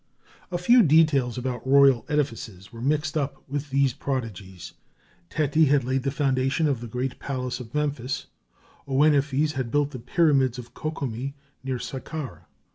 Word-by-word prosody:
A 175 - 0
few 235 +8 +6
details 150 - +4
about 125 -1 -3
royal 135 -2 +5
edifices 115 - -3
were 115 - -9
mixed 150 +5 0
up 140 -2 -2
with 145 +1 -4
these 135 -1 +2
prodigies. 110 - -5 0.6
Teti 155 +1 +2
had 140 -1 +3
laid 130 +2 0
the 135 - -1
foundation 135 +1 +1
of 135 -5 -1
the 120 - -6
great 125 +3 -3
palace 130 -2 -3
of 120 +1 -10
Memphis, 140 -3 -2 0.6
Ouenephes 145 +1 +3
had 130 -5 -3
built 145 +3 +1
the 130 - -7
pyramids 135 -1 +2
of 120 -1 -9
Ko 155 - -3
kome 135 -2 -4 0.3
near 130 -1 -2
Saqqara. 135 +3 -6
135 Hz, 155 wpm, -25 LUFS, 125-145 Hz, 0.6 s, few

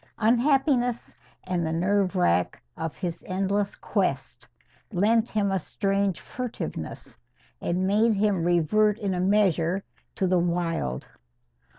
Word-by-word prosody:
Unhappiness 245 +1 +2 0.3
and 180 -2 -1
the 160 - -1
nerve 190 +3 +1
wrack 90 - +1 0.2
of 160 -1 -5
his 175 -3 -4
endless 195 +2 -1
quest 135 - -2 0.4
lent 220 +4 +2
him 205 -2 0
a 190 - +1
strange 195 +1 -1
furtiveness, 250 -2 -6 0.4
and 180 +2 0
made 215 +3 +3
him 200 -4 +1
revert 175 +5 +3
in 200 -4 -2
a 180 - -2
measure 190 -2 +2 0.3
to 190 - 0
the 180 -1 +3
wild. 170 - -1
195 Hz, 120 wpm, -26 LUFS, 175-210 Hz, 0.4 s, made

